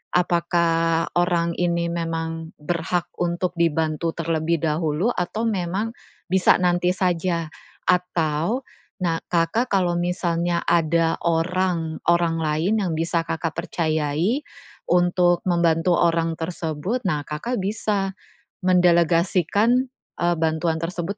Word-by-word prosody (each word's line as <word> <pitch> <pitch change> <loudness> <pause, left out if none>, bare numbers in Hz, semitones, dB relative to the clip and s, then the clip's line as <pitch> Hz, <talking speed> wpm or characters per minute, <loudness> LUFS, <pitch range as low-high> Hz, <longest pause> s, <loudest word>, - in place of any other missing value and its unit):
apakah 170 -1 +2
orang 175 -1 +1
ini 170 -1 0
memang 165 -1 -4
berhak 170 +2 -1 0.2
untuk 175 +1 -1
dibantu 160 0 0
terlebih 165 -1 0
dahulu 160 +5 0
atau 195 +6 -2
memang 195 +1 -1 0.4
bisa 190 -1 +5
nanti 180 0 +2
saja 175 -2 0 0.4
atau 180 - 0 0.4
nah, 165 -2 0
Kakak 175 +9 +1
kalau 180 -3 +2
misalnya 175 -1 -1
ada 165 -1 +2
orang 170 -1 0
orang 170 -1 +2
lain 160 +8 +1
yang 175 -4 -1
bisa 165 +1 0
Kakak 165 0 -2
percayai 160 - 0 0.5
untuk 175 0 +3
membantu 170 0 +2
orang 165 -1 +2
tersebut, 165 +6 -3
nah 150 -5 0
Kakak 215 +11 -3
bisa 200 -1 -1 0.5
mendelegasikan, 180 - +3 0.3
eee, 175 0 +2
bantuan 160 0 0
tersebut 180 +3 -3
170 Hz, 110 wpm, -23 LUFS, 165-180 Hz, 0.5 s, bisa